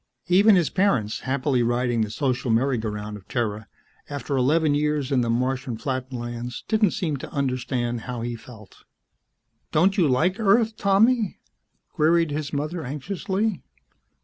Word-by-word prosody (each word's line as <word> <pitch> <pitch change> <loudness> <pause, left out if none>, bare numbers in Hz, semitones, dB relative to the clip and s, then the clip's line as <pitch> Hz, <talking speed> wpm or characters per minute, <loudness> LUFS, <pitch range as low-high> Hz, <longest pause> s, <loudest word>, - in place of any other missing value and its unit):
Even 200 +4 +6
his 175 -4 +2
parents, 130 - +1
happily 130 -1 0
riding 120 0 +1
the 110 - -1
social 130 +2 -1
merry 120 +2 +2
go 110 0 -2
round 105 0 -5
of 95 - -17
Terra, 110 -3 -2 0.4
after 145 0 -3
eleven 145 +4 +3
years 150 -2 0
in 130 -2 +3
the 120 - -1
Martian 125 0 -1
flatlands, 125 -2 -4
didn't 215 -3 +3
seem 160 -4 -2
to - - -9
understand 125 -3 -2
how 125 0 -5
he 120 0 -3
felt. 110 -4 -14 0.9
"Don't 185 +6 +3
you 170 - +4
like 160 - +1
Earth, 220 +1 +3
Tommy?" 215 +1 +2 0.5
queried 165 +1 +2
his 145 -1 -3
mother 155 +4 -3
anxiously. 190 - -2
135 Hz, 150 wpm, -24 LUFS, 120-170 Hz, 0.9 s, Even